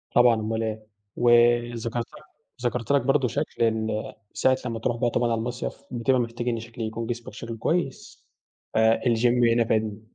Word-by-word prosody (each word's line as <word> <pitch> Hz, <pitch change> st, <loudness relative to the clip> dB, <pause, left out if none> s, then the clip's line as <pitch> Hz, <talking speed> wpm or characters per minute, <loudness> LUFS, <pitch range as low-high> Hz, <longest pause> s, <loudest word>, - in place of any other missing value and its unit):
طبعًا 120 Hz, -1 st, +6 dB
اومال 110 Hz, +1 st, -2 dB
إيه 110 Hz, -1 st, -4 dB, 0.3 s
وذكرت 120 Hz, -1 st, +3 dB
لك -, -, -15 dB, 0.4 s
ذكرت 120 Hz, +1 st, -1 dB
لك 140 Hz, -, +4 dB
برضه 135 Hz, 0 st, +2 dB
شكل 140 Hz, -2 st, -2 dB
ال 110 Hz, -1 st, -1 dB, 0.2 s
ساعة 130 Hz, 0 st, +2 dB
لمّا 115 Hz, -2 st, -3 dB
بتروح 120 Hz, +1 st, -1 dB
بقى 120 Hz, 0 st, +1 dB
طبعًا 120 Hz, 0 st, 0 dB
على 115 Hz, -, +1 dB
المصيف 120 Hz, +2 st, -3 dB, 0.2 s
بتبقى 125 Hz, +1 st, +1 dB
محتاج 120 Hz, 0 st, -3 dB
إن 115 Hz, -1 st, -1 dB
شكل 115 Hz, 0 st, -9 dB
يكون 115 Hz, +1 st, -3 dB
جسمك 120 Hz, -3 st, -5 dB
شكله 115 Hz, +1 st, -7 dB
كويس 160 Hz, +2 st, -2 dB, 0.5 s
ف -, -, -1 dB, 0.2 s
الGym 120 Hz, -1 st, +3 dB
هنا 115 Hz, -1 st, +2 dB
فادني. 110 Hz, -1 st, -1 dB
120 Hz, 170 wpm, -25 LUFS, 115-120 Hz, 0.5 s, طبعًا